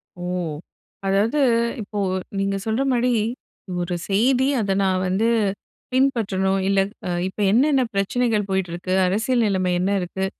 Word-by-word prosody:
ஓ! 175 - -8 0.8
அதாவது 210 +9 +2 0.4
இப்போ 205 0 -5 0.4
நீங்க 195 0 0
சொல்ற 225 +4 0
மாரி 245 0 +2 0.7
ஒரு 175 0 -2
செய்தி 250 +6 +3
அத 200 -3 -1
நான் 185 -1 +1
வந்து 195 +5 +1 0.7
பின்பற்றணும் 195 -8 +1
இல்ல 195 0 +3 0.3
அ - - -2 0.2
இப்ப 190 - -9
என்னென்ன 270 +4 +4
பிரச்சனைகள் 210 +1 0
போயிட்டிருக்கு? 185 -1 -2
அரசியல் 225 +5 +1
நிலைமை 185 -3 +1
என்ன 190 +2 0
இருக்கு? 190 +2 -3
200 Hz, 125 wpm, -22 LUFS, 190-235 Hz, 0.8 s, என்னென்ன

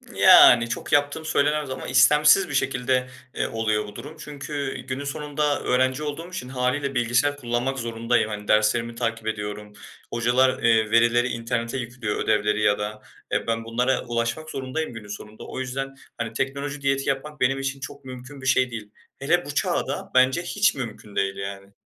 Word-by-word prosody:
Yani, 115 0 +8
çok - - -5
yaptığım 145 +2 +2
söylenemez 150 -1 +1
ama 130 0 -5
istemsiz 150 +6 +5
bir - - -5
şekilde, 130 -1 0 0.3
eee, - - 0
oluyor 110 -2 -1
bu 105 - -11
durum. 155 +3 -9
Çünkü 145 -2 -5
günün 130 +2 -3
sonunda 145 +1 -1
öğrenci 130 +3 +1
olduğum 150 +4 -5
için, 180 -9 -6
hâliyle, 135 +2 -1
bilgisayar 125 +4 +2
kullanmak 125 +1 -2
zorundayım. 115 0 0
Hani, 105 -1 -6
derslerimi 115 +2 +2
takip 115 -2 -3
ediyorum, 105 -1 -4 0.4
hocalar, 125 +2 +2
eee, 110 -2 +3
verileri 120 +2 +4
internete 115 +1 -2
yüklüyor 120 -3 -4
ödevleri 105 -1 +1
ya 100 -1 +3
da, 105 +1 -5 0.3
eee, - - -1
ben 115 0 -1
bunlara 125 +3 0
ulaşmak 120 +7 -2
zorundayım 135 +2 -4
günün 110 -2 -9
sonunda. 105 +1 -9
O - - -6
yüzden, 135 +1 -4 0.2
hani, 115 -1 -4
teknoloji 140 +3 -3
diyeti 135 0 0
yapmak 150 +2 -3
benim 135 +2 +2
için 135 0 -3
çok 140 +1 -9
mümkün 130 +2 -9
bir 130 - -5
şey 130 -1 +3
değil. 105 -3 -7 0.3
Hele - - +1
bu - - -6
çağda - - -1
bence 130 +5 +4
hiç 205 +3 +1
mümkün 110 -5 -7
değil 95 0 0
yani. 100 0 -7
125 Hz, 170 wpm, -24 LUFS, 115-140 Hz, 0.4 s, Yani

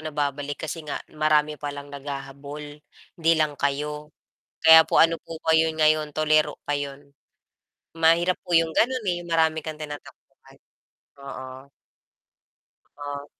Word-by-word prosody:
nababalik 145 -1 -3
kasi 160 +2 -5
nga 145 - -3 0.2
marami 150 -1 +1
pa 145 - -4
lang 145 0 -10
naghahabol, 140 +1 -8 0.4
'di 165 0 +4
lang 155 -1 +1
kayo. 150 +2 -2 0.6
Kaya 160 0 +10
po - - +1
ano 165 0 +3
po 165 - -8
ba 160 - +3
'yon 160 0 +2
ngayon, 155 -1 +3
tuliro 155 -1 +2
pa 145 - -2
'yon. 140 0 -7 0.9
Mahirap 165 +2 +3
po 175 - -4
yung 165 0 +2
ganun, 250 0 +2
eh, 175 0 -2
yung - - -11
marami 160 -1 +2
kang 155 -1 -6
tinatakbuhan, 150 -1 -11 0.6
oo. 130 0 -9 1.3
Ah. 145 0 -6
150 Hz, 140 wpm, -24 LUFS, 145-160 Hz, 1.3 s, Kaya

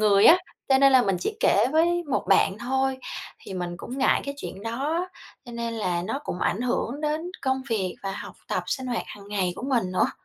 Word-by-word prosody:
người 205 -1 +5
á, 345 - +9 0.3
cho 265 - +5
nên 275 0 +6
là 260 - +7
mình 195 -5 +1
chỉ - - -2
kể 210 +4 +4
với 345 +2 +3
một - - +1
bạn 195 +1 +4
thôi. 265 +3 0 0.4
Thì 190 - -8
mình 175 -1 -3
cũng 250 +9 -7
ngại 265 - +3
cái 280 - -4
chuyện 195 -7 -7
đó 290 +10 -1 0.4
cho 240 - -10
nên 235 0 -3
là 180 -6 -1
nó 245 +8 -2
cũng - - -4
ảnh 210 - +1
hưởng 250 +2 -1
đến 310 +3 -1
công 265 -1 0
việc 190 -5 0
và 195 -1 -2
học - - -7
tập, - - 0
sinh 260 -2 -2
hoạt 240 -2 -1
hàng 200 -1 -11
ngày 190 -3 0
của - - -7
mình 235 -9 0
nữa. 225 +7 +2
240 Hz, 230 wpm, -26 LUFS, 200-270 Hz, 0.4 s, á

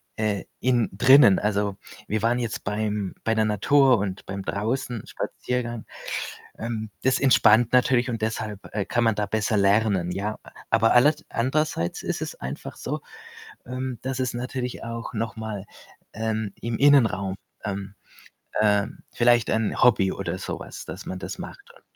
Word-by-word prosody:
äh, 105 -3 -1 0.2
innen 125 -4 +2
drinnen. 125 -1 +7
Also 100 -1 0 0.3
wir 110 -1 -1
waren 120 +2 +2
jetzt 115 -2 -3
beim 105 -1 -2
bei 115 0 +1
der 110 0 +3
Natur 125 +4 +4
und 95 -1 -4
beim 100 0 -5
Draußen-Spaziergang. 120 +2 -3 0.7
Ähm, 110 -1 -4
das 130 0 +3
entspannt 120 -3 +5
natürlich 125 0 +3
und 115 -3 -3
deshalb, 110 -2 -2
äh, 105 -2 -1
kann 120 -1 +1
man 110 -2 +3
da 105 - 0
besser 110 +1 0
lernen, 100 -3 +2
ja. 105 +3 -3 0.3
Aber 115 0 +4
aller 135 +6 +6 0.2
andererseits 130 - -1
ist - - -2
es - - -4
einfach 65 +2 -7
so, - - -3 0.7
ähm, 130 0 -4
dass 130 0 -3
es 130 -1 -1
natürlich 125 +1 -4
auch 115 0 -5
noch 110 +1 -3
mal, 110 -3 -5 0.5
ähm, 110 -2 -2
im 115 -1 -2
Innenraum, 110 -10 +4 0.3
ähm 100 -1 -4 0.7
ähm, 105 -1 +2
vielleicht 120 -1 +3
'n 110 -1 0
Hobby 100 -6 +5
oder - - -4
so - - -4
was, - - -9
dass - - -7
man 95 - -5
das - - -6
macht - - -9
und - - -20
110 Hz, 155 wpm, -25 LUFS, 105-120 Hz, 0.7 s, drinnen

